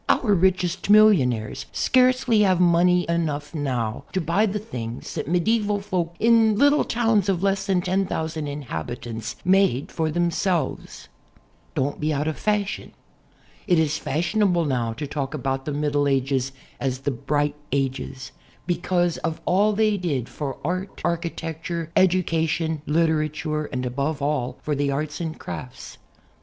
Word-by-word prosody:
Our 215 -5 +3
richest 185 0 +1
millionaires 150 - +4
scarcely 255 -3 +3
have 185 -3 +3
money 180 0 +4
enough 150 -3 -1
now 130 -4 -2
to 190 - +1
buy 185 +6 +2
the 205 +1 -2
things 120 - -6
that - - -4
medieval 205 +5 +1
folk 180 -4 -2
in 225 -2 +4
little 285 +3 +4
towns 225 -4 +1
of 185 -1 0
less 195 0 +1
than 190 -2 +2
10,000 165 -4 -1
inhabitants 120 - -5
made 185 -8 +3
for 160 -1 -1
themselves. 175 -1 -1 0.7
Don't 140 +2 -1
be 155 +1 0
out 150 +1 -1
of 160 - 0
the - - -14
fashion. 210 -1 -1 0.7
It 180 -3 +4
is 155 -2 +1
fashionable 175 +3 +1
now 120 -5 -1
to 150 +6 -5
talk 140 0 -3
about 135 -1 -2
the 150 - -2
Middle 145 0 0
Ages 135 -1 0 0.3
as 130 -1 -2
the 140 - -1
"Bright 145 +3 -1 0.2
Ages" 130 -1 -2 0.3
because 175 -1 0
of 165 -1 -3
all 205 +4 +3
they 215 0 +2
did 145 - -2
for 140 -3 -5
art, 185 +4 -3
architecture, 165 -1 -3
education, 165 -4 +1
literature, 155 -1 0
and 125 -2 -4
above 140 +4 -2
all, 140 -3 -1
for 150 - -1
the 140 0 0
arts 150 +3 -3
and 160 -1 -4
crafts. 130 -2 -8
160 Hz, 145 wpm, -24 LUFS, 140-185 Hz, 0.7 s, millionaires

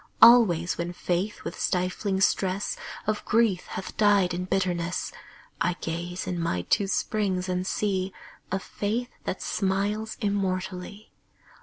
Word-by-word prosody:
Always 200 -9 +7
when 170 +1 -2
Faith 180 +4 -2
with - - -6
stifling 190 +2 0
stress 195 0 +1 0.3
Of 215 0 -1
grief 220 -5 +2
hath 190 - -6
died 200 -4 +4
in 180 +1 -2
bitterness, 180 -2 -1 0.5
I 175 +1 +2
gaze 175 +2 -4
in 180 -1 -2
my 90 - -1
two 195 - +2
springs 190 -2 0
and 180 0 -1
see 190 -2 0 0.4
A 190 - +2
Faith 215 +5 -3
that 185 - -3
smiles 205 +3 -1
immortally. 195 -1 -2
190 Hz, 130 wpm, -27 LUFS, 180-205 Hz, 0.5 s, Always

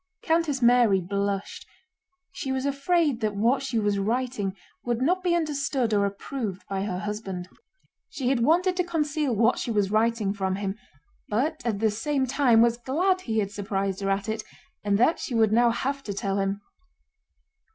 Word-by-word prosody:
Countess 320 -5 +1
Mary 235 -5 +5
blushed. 200 +2 -3 0.6
She 275 -7 -4
was 265 0 -1
afraid 280 -1 +1
that 210 -2 -1
what 235 +6 +2
she 270 -4 -2
was 205 -2 +1
writing 220 -2 -1 0.3
would 240 -1 -1
not 355 +8 +1
be 355 -2 +2
understood 280 -7 0
or 200 -1 +3
approved 200 -1 -5
by 195 0 -2
her 185 -3 -3
husband. 195 -3 -5 0.6
She 255 -3 -2
had 265 -2 +2
wanted 350 +9 +3
to 360 - +2
conceal 300 -6 -1
what 230 +4 +3
she - - -3
was 205 -3 +1
writing 220 -2 +1
from 190 -2 -1
him, 195 0 -3 0.5
but 300 +9 0
at 225 -4 0
the 220 +1 +2
same 270 +5 -1
time 250 -3 +4
was 235 0 +2
glad 355 +10 0
he 225 -9 -3
had 200 -2 0
surprised 195 -1 -2
her 195 - -1
at 195 +1 0
it 220 0 -3 0.4
and 205 -1 +2
that 245 +9 +3
she 245 - -4
would 220 -2 +3
now 235 +2 +4
have 275 +4 -2
to 200 - -4
tell 195 0 -1
him. 195 +1 -1
230 Hz, 180 wpm, -26 LUFS, 200-275 Hz, 0.6 s, Mary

